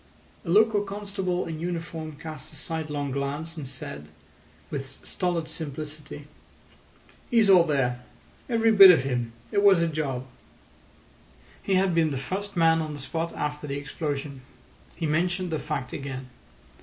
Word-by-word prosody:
A 170 - -7
local 210 +3 +5
constable 195 -3 -2
in 160 -1 -5
uniform 165 -2 -4
cast 155 -1 -8
a - - -12
sidelong 150 -3 -3
glance, 145 +4 -3
and 150 -5 -6
said, 75 - -7 0.6
with 135 -2 -6
stolid 175 -3 -1
simplicity: 150 -1 -6 1.0
"He's 225 -5 +5
all 180 -3 +7
there. 125 -5 0 0.5
Every 225 -1 +3
bit 195 -3 +11
of 165 -7 +6
him. 120 -3 -2 0.2
It 200 - +2
was 200 -3 +6
a 170 - +2
job." 140 -5 -2 1.4
He 195 - +1
had 185 -1 +3
been 165 -1 +3
the 140 - -2
first 195 +8 -4
man 165 -1 +4
on 155 -1 -4
the - - -8
spot 165 +5 -3
after 150 0 -3
the 140 0 -3
explosion. 145 -1 -4 0.5
He 165 - -3
mentioned 175 +3 0
the 155 - -1
fact 150 -4 -4
again. 135 -2 -6
155 Hz, 150 wpm, -26 LUFS, 140-180 Hz, 1.4 s, bit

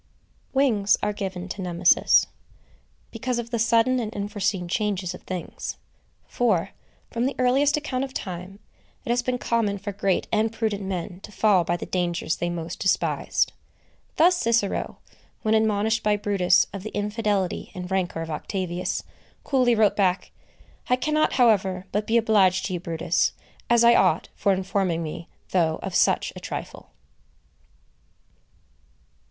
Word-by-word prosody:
Wings 235 -7 +3
are 210 - 0
given 190 -3 -5
to 195 - -5
Nemesis, 175 -1 +4 0.9
because 245 +2 -2
of 235 0 -5
the 235 - -1
sudden 230 +3 +3
and 220 -3 -3
unforeseen 205 -2 -2
changes 190 -1 -1
of - - -10
things; 185 -2 -6 0.5
for, 195 -7 +1 0.4
from 235 +2 0
the 275 - -3
earliest 270 +4 +3
account 270 -4 -2
of 270 - -5
time, 185 -4 -6 0.5
it - - -1
has 245 +1 +2
been 250 0 -1
common 230 -4 0
for 200 +1 -5
great 195 -2 0
and 220 0 +1
prudent 220 -3 -2
men 180 -2 -4
to 210 - -12
fall 205 -4 +3
by 175 +1 -1
the - - -6
dangers 175 -3 -1
they 175 - -2
most 170 -1 -5
despised. 190 - +1 0.6
Thus 355 +3 +5
Cicero, 230 - 0 0.5
when 215 - +2
admonished 220 +1 +2
by 210 -1 +2
Brutus 200 -3 +3
of 200 - -5
the 215 - -7
infidelity 205 -3 -1
and 180 0 -6
rancor 180 -3 -1
of 165 - -7
Octavius, 180 +2 -3 0.4
coolly 255 -4 +2
wrote 215 -2 +3
back: 185 -2 +1 0.6
"I 250 - +5
cannot, 305 +4 +1
however, 195 -7 +2
but 210 +1 -1
be 230 - +3
obliged 200 -5 +3
to 185 - -3
you, 175 - -2
Brutus, 170 -1 0 0.4
as 235 0 +5
I 235 0 +7
ought, - - +3
for 200 - +1
informing 190 -3 0
me, 165 +2 -6 0.2
though 165 -4 +2
of - - -4
such - - +2
a - - -7
trifle." - - -7
205 Hz, 150 wpm, -24 LUFS, 185-230 Hz, 0.9 s, I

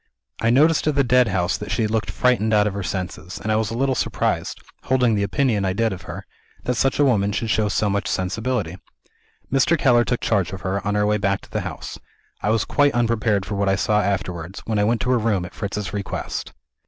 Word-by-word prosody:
"I 115 - +2
noticed, 155 +6 +4
at 150 - +2
the 140 - +4
Deadhouse, 110 -8 +2
that 105 - -6
she 115 - 0
looked 110 -1 -1
frightened 110 +1 +2
out 105 -1 +4
of 105 - -1
her 100 - -4
senses; 90 -2 -5
and 110 - -2
I - - +3
was 110 -1 0
a 115 - -4
little 135 +1 +1
surprised - - -1 0.3
holding 125 -3 +2
the 105 - +1
opinion 105 0 +1
I 95 -1 0
did 115 +1 0
of 90 - -8
her - - -7 0.4
that 125 - 0
such 135 +2 +1
a 145 - +4
woman 105 -6 +2
should 110 +2 -2
show 105 -1 +1
so 105 - +1
much 100 0 -1
sensibility. 95 -1 -2 0.8
Mr. 135 +5 +3
Keller 120 -4 +4
took 120 0 -2
charge 100 -4 0
of 95 - -6
her, 95 +2 -2
on 105 - 0
our 105 0 +2
way 105 0 +1
back 100 -1 0
to - - -17
the - - -1
house. - - -7 0.4
I - - 0
was 110 0 +2
quite 145 -2 +2
unprepared 115 -4 +1
for 105 - -5
what 100 -1 +1
I 95 - +3
saw 105 +2 +2
afterwards, 90 -2 -3
when 110 -2 0
I 105 - +3
went 115 0 +1
to 125 - 0
her 125 - +3
room 105 -5 0
at 90 - -10
Fritz's 100 -2 -4
request. 100 -1 -4
105 Hz, 235 wpm, -22 LUFS, 100-120 Hz, 0.8 s, noticed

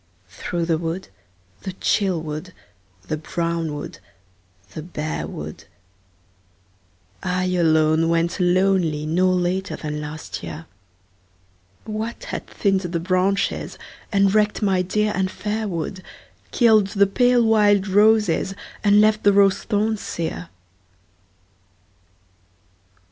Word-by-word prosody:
Through 170 - -3
the 165 -2 +1
wood, 170 +3 -4 0.5
the 190 - -5
chill 190 -2 +1
wood, 155 +3 -6 0.5
the 155 - -3
brown 165 -1 -2
wood, 145 - -7 0.7
the 155 - -5
bare 155 -1 -4
wood, - - -8 1.6
I 185 0 -1
alone 160 -1 +3
went 170 +2 0
lonely 180 -4 +2
no 180 +4 +2
later 185 +1 0
than 150 -1 -5
last 150 +1 -7
year, 160 +2 -7 1.2
What 220 +2 -5
had - - -6
thinned 195 -2 +1
the 175 -2 -3
branches, 185 +3 0 0.3
and 195 -1 +3
wrecked 210 0 +2
my 190 -2 +2
dear 210 +3 0
and 190 0 0
fair 215 +2 -3
wood, 185 +1 -4 0.5
Killed 220 -5 +4
the 200 0 +3
pale 245 +4 +3
wild 205 -3 +4
roses 205 -2 +3 0.3
and 205 0 +5
left 215 0 +3
the 205 - +4
rose 195 -1 +4
thorns 215 0 0
sere 90 - -4
185 Hz, 115 wpm, -22 LUFS, 165-205 Hz, 1.6 s, and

